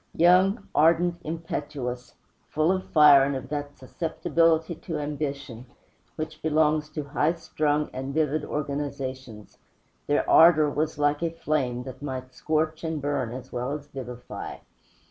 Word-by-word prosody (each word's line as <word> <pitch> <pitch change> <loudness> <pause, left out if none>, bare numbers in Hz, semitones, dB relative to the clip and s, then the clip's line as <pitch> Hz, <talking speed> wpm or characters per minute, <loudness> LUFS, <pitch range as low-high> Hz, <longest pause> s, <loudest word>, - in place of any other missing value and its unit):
Young, 185 +5 +4
ardent, 170 +2 +3
impetuous, 145 -6 -5 0.3
full 155 +3 +2
of 190 0 -2
fire 150 -3 +7
and 140 0 0
of 130 0 -6
that 145 -1 -5
susceptibility 165 +3 0
to 165 0 -6
ambition 140 -5 -5 0.5
which 155 -1 -6
belongs 155 -1 +2
to 155 -1 -5
high 150 +3 +1
strung 150 -2 -1
and 135 +1 -4
vivid 155 0 0
organizations, 135 -6 -5 0.5
their 145 - +1
ardor 155 -3 +6
was 155 +1 -2
like 145 0 +1
a 170 - +1
flame, 140 -7 -2
that 130 +1 -9
might 130 -2 -6
scorch 155 +2 -1
and 160 -2 -2
burn 140 -4 -2
as 125 +1 -8
well 125 +3 -3
as 150 -1 -6
vivify. 125 -3 -7
150 Hz, 140 wpm, -26 LUFS, 135-160 Hz, 0.5 s, fire